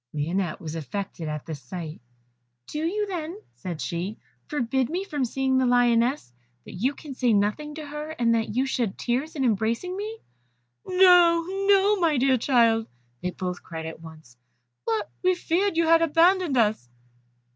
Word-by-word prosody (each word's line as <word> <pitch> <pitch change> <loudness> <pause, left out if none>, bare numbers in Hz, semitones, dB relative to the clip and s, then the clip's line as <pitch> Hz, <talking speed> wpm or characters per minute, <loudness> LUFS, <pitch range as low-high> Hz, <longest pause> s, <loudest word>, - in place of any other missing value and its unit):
Lionette 170 +3 -1
was 155 -2 -6
affected 170 +1 -5
at 150 -1 -4
this 155 -4 -7
sight. 155 +3 -7 0.6
"Do 300 - -5
you 385 +7 0
then," 350 -2 -5 0.2
said 175 -5 -6
she, 175 +7 -3 0.3
"forbid 265 -3 0
me 360 +4 -2
from 295 -8 -3
seeing 265 +1 +1
the 260 - +2
lioness, 245 - +2 0.3
that - - -10
you 255 +10 -1
can 290 -1 -9
say 250 -3 +1
nothing 210 +9 0
to 310 -1 -7
her, 300 +1 -6
and 235 -7 +1
that 225 -2 -1
you 260 +2 +2
shed 240 -7 -1
tears 265 +7 -2
in 270 -3 0
embracing 230 - 0
me?" 425 +3 -5 0.7
"No, 355 -2 +6 0.2
no, 400 +1 +5
my 325 -5 +2
dear 260 0 +3
child," 230 -3 +3 0.3
they 180 - -1
both 180 0 -5
cried 160 -2 -7
at 160 0 -7
once, 155 -7 -13 0.5
"but 215 -2 -1
we 370 0 +3
feared 370 +4 0
that - - -7
you 335 - +3
had 330 0 +5
abandoned 330 -1 +3
us." 210 - +1
255 Hz, 170 wpm, -25 LUFS, 195-330 Hz, 0.7 s, No